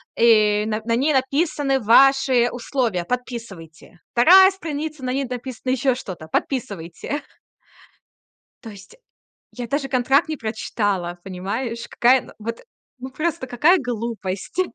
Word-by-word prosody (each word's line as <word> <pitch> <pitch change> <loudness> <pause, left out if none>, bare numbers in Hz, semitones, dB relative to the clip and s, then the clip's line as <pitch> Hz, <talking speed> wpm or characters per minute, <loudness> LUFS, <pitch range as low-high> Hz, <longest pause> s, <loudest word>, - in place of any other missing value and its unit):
э, 215 -2 +4
на 215 0 -2
на 230 0 +1
ней 285 +6 +1
написаны 275 0 0
ваши 260 +1 +4
условия, 235 -7 -2
подписывайте. 210 -10 -7
2 375 +10 +7
страница, 310 -5 -6
на 255 0 -2
ней 275 +1 -1
написано 250 0 -5
ещё 260 0 +1
что-то. 180 -10 -8
Подписывайте". 200 - -4 1.4
То 225 - -8
есть 200 - -14 0.6
я 245 -1 -6
даже 280 0 -2
контракт 270 +5 +2
не 310 - -3
прочитала, 205 -6 -3
понимаешь? 225 +6 -4
Какая 250 +1 +3
на - - -15
вот, 230 +2 -5 0.4
ну, 260 +1 -8
просто 305 0 -3
какая 295 +10 +3
глупость. 230 - -4
245 Hz, 125 wpm, -21 LUFS, 215-275 Hz, 1.4 s, 2